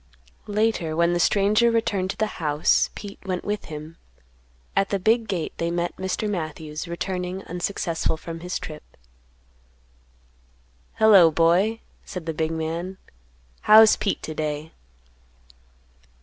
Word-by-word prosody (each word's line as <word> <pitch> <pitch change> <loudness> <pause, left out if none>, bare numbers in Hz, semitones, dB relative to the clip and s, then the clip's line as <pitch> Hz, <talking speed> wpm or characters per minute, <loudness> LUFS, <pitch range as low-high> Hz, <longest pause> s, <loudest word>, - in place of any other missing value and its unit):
Later 210 -6 0
when 170 +1 +2
the 175 - 0
stranger 210 +6 +3
returned 205 -5 0
to - - -4
the 215 -4 -3
house, 150 -1 +2
Pete 205 -1 -9
went 185 -2 -3
with 210 0 -3
him; 155 +1 -9 0.8
at 195 0 +2
the 200 - 0
big 220 +4 +2
gate 180 -5 -3
they 170 - -1
met 175 0 -2
Mr. 190 +3 -2
Matthews, 155 -4 -4
returning 180 +2 -4
unsuccessful 175 -2 -2
from 165 +1 -7
his 180 +2 -4
trip. 155 -1 -8 2.1
"Hello, 200 -6 +7
boy!" 175 +8 +2 0.2
said 180 -4 -7
the 165 - -2
big 160 +1 -1
man; 165 +4 -4 0.6
"How's 220 0 +8
Pete 200 - -2
to 155 - -5
day?" 155 0 -4
180 Hz, 130 wpm, -24 LUFS, 160-205 Hz, 2.1 s, How's